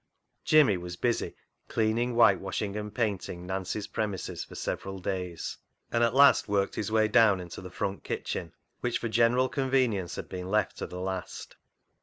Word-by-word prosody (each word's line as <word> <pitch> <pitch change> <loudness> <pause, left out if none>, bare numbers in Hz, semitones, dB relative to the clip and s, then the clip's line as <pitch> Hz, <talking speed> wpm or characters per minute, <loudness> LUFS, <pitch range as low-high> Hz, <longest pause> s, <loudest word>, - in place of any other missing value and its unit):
Jimmy 145 -11 +5
was 90 0 -6
busy 120 +5 -1 0.3
cleaning, 115 +2 0
whitewashing, 100 -2 +3
and 105 0 -4
painting 100 -5 -2
Nancy's 95 +2 -3
premises 105 -3 -3
for - - -12
several 95 0 -4
days, 90 -2 -4 0.3
and 120 0 +2
at 115 +1 +2
last 140 +1 +6
worked 100 -1 +1
his 105 +1 -3
way 110 -1 +4
down 105 -2 +5
into 90 -1 -8
the 90 - -8
front 95 +2 -3
kitchen, - - -4 0.3
which 120 -1 0
for 115 - -3
general 120 +3 +3
conven 130 -3 +1
ience 95 -4 -4
had - - -6
been 90 0 -6
left 105 0 +1
to - - -4
the 90 - -7
last. 95 -1 -5
105 Hz, 170 wpm, -29 LUFS, 95-115 Hz, 0.3 s, last